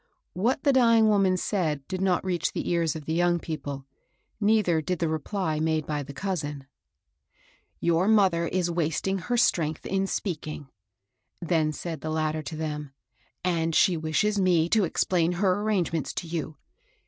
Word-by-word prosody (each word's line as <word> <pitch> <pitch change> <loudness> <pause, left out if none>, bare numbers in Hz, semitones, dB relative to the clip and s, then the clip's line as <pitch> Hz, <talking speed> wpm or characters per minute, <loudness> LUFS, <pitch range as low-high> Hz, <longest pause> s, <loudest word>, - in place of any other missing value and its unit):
What 235 +10 0
the 280 - +4
dying 230 -4 +5
woman 195 -3 +3
said 155 -8 -1
did 185 0 -4
not 190 -1 +1
reach 180 -2 -1
the - - -3
ears 165 -3 +1
of 155 -2 -7
the 160 - -2
young 175 +1 +2
people; 145 -4 -6 0.5
neither 205 -6 +3
did 180 +4 -2
the 165 - 0
reply 160 +1 -2
made 160 -1 0
by 150 -1 -2
the 140 - -8
cousin. 145 -5 -4 1.1
Your 170 +2 +2
mother 190 -6 +3
is 175 -1 0
wasting 170 +3 -1
her 240 +8 -1
strength 160 -9 +1
in 195 0 0
speaking," 155 -7 -4 0.7
then 165 -3 +1
said 160 0 -6
the 155 - -4
latter 155 0 -1
to 155 +2 -7
them; 150 -3 -4 0.5
^'and 165 -2 0
she 185 -3 +4
wishes 165 +7 0
me 175 -3 +3
to 215 -1 +3
explain 175 0 +1
her 185 +2 +1
arrangements 180 -7 -1
to - - -4
you. 160 -2 -4
170 Hz, 160 wpm, -26 LUFS, 155-190 Hz, 1.1 s, dying